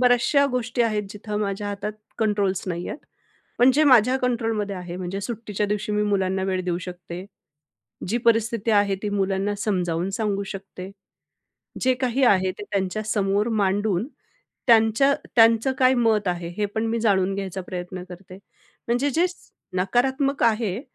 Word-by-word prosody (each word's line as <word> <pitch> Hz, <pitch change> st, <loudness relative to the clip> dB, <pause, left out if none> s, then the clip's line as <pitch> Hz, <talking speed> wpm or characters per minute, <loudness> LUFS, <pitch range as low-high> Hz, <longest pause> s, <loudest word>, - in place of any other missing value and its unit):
बऱ्याचश्या 250 Hz, +3 st, +4 dB
गोष्टी 245 Hz, 0 st, 0 dB
आहेत, 215 Hz, -2 st, 0 dB
जिथं 210 Hz, 0 st, -6 dB
माझ्या 205 Hz, 0 st, -2 dB
हातात 205 Hz, +1 st, -4 dB, 0.3 s
कंट्रोल्स 205 Hz, -4 st, 0 dB
नाहीयेत. 175 Hz, +8 st, -4 dB, 0.6 s
पण 250 Hz, +2 st, +6 dB
जे 305 Hz, +1 st, +4 dB
माझ्या 255 Hz, -2 st, +5 dB
कंट्रोलमध्ये 225 Hz, -5 st, -1 dB
आहे, 180 Hz, -1 st, -7 dB
म्हणजे 185 Hz, +2 st, -4 dB
सुट्टीच्या 210 Hz, -2 st, -3 dB
दिवशी 210 Hz, +1 st, -2 dB
मी 210 Hz, 0 st, +1 dB
मुलांना 190 Hz, -2 st, 0 dB
वेळ 190 Hz, -1 st, -1 dB
देऊ 175 Hz, -1 st, -1 dB
शकते. 180 Hz, 0 st, -8 dB, 0.8 s
जी 235 Hz, +4 st, +1 dB
परिस्थिती 230 Hz, -1 st, +2 dB
आहे, 205 Hz, -2 st, +3 dB
ती 210 Hz, -, -1 dB
मुलांना 195 Hz, 0 st, 0 dB
समजावून 180 Hz, -3 st, -1 dB
सांगू 205 Hz, -2 st, -1 dB
शकते. 195 Hz, -1 st, -8 dB, 0.9 s
जे 255 Hz, 0 st, +3 dB
काही 255 Hz, +1 st, 0 dB
आहे, 190 Hz, -4 st, +4 dB
ते 205 Hz, -, -10 dB
त्यांच्यासमोर 200 Hz, +1 st, 0 dB
मांडून 200 Hz, +2 st, 0 dB, 0.6 s
त्यांच्या 230 Hz, +4 st, +5 dB, 0.2 s
त्यांचं 230 Hz, +3 st, +5 dB
काय 255 Hz, -1 st, +5 dB
मत 220 Hz, -5 st, +2 dB
आहे, 175 Hz, -1 st, -2 dB
हे 210 Hz, -, +1 dB
पण 220 Hz, +1 st, 0 dB
मी 230 Hz, +1 st, -1 dB
जाणून 195 Hz, -3 st, +2 dB
घ्यायचा 195 Hz, -1 st, -4 dB
प्रयत्न 180 Hz, 0 st, -6 dB
करते. 185 Hz, +1 st, -11 dB, 0.5 s
म्हणजे 245 Hz, +5 st, +1 dB
जे 330 Hz, +6 st, +2 dB, 0.5 s
नकारात्मक 265 Hz, +9 st, +1 dB
आहे, 220 Hz, -2 st, +1 dB
210 Hz, 145 wpm, -24 LUFS, 190-230 Hz, 0.9 s, पण